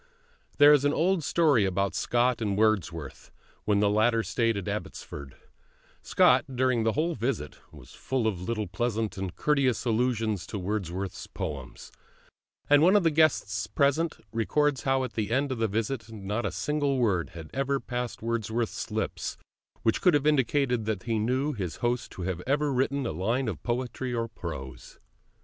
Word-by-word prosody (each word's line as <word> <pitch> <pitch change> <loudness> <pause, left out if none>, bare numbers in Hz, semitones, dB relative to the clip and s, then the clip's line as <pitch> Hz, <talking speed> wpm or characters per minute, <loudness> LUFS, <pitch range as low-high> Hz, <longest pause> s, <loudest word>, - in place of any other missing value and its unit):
There 145 0 +8
is 145 -2 +4
an 145 - +2
old 180 +1 +2
story 145 -8 +3
about 95 +1 0
Scott 120 0 +1
and 100 -3 -1
Wordsworth, 85 -10 0 0.4
when 105 -1 +2
the 105 - +4
latter 115 +2 +3
stayed 115 -2 0
at 100 - -5
Abbotsford; 70 -2 -6 0.7
Scott, - - +4
during 130 -2 +2
the 110 0 +1
whole 165 +4 0
visit, 120 - -3
was - - -14
full 130 -3 -2
of 100 -6 -1
little 110 +3 -2
pleasant 110 +3 -2
and 95 -2 -4
courteous 135 -5 +1
allusions 115 -4 0
to - - -5
Wordsworth's 95 -1 -4
poems; 70 -4 -6 0.8
and 145 0 +6
one 185 +5 +5
of 205 - +5
the 165 - +3
guests 110 -11 +2
present 150 +4 +1
records 140 +5 +1
how 135 0 +2
at 130 - -5
the 105 -3 -2
end 135 +4 +1
of 125 - -3
the 115 - +2
visit 115 +2 -3
not 105 +1 -3
a - - -3
single 145 -2 0
word 100 -10 0
had 80 -2 -9
ever 140 +1 0
passed 125 -3 -5
Wordsworth's 115 0 -2
lips - - -3 0.5
which 110 - +1
could 180 -5 +5
have 145 0 +1
indicated 135 -4 +2
that 105 -4 -2
he 115 -2 -1
knew 130 +7 0
his 95 -7 -4
host 120 0 -1
to 90 - -6
have 90 -1 -3
ever 145 +1 +1
written 135 +2 0
a - - -1
line 115 - -1
of 110 - -4
poetry 125 +1 -3
or 115 0 -1
prose. 65 - -8
115 Hz, 170 wpm, -28 LUFS, 105-135 Hz, 0.8 s, There